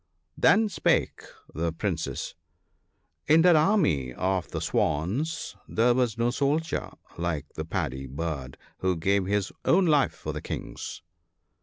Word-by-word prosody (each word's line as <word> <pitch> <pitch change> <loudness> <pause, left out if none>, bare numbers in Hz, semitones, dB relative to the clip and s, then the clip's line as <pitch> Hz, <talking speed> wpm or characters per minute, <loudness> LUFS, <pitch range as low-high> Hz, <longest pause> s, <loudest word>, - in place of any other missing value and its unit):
Then 220 +2 +4
spake 200 - +1 0.3
the 85 +2 -1
Princes: 80 -1 -3 0.3
— - - -47
" 80 0 -47
In 160 +2 +6
that 180 -2 +7
army 150 - +2
of 95 +1 -1
the - - -3
Swans 125 - -1
there 120 +2 +3
was 120 -3 +1
no 120 +1 +2
soldier 145 +5 0 0.3
like 85 -4 -1
the 80 - -5
Paddy 65 -4 -3
bird, 70 -1 -4 0.2
who 95 -1 +1
gave 95 +3 +1
his 100 -1 0
own 185 +2 +4
life 150 -5 +3
for - - -5
the - - -5
King's." - - -6
100 Hz, 145 wpm, -27 LUFS, -, 0.3 s, that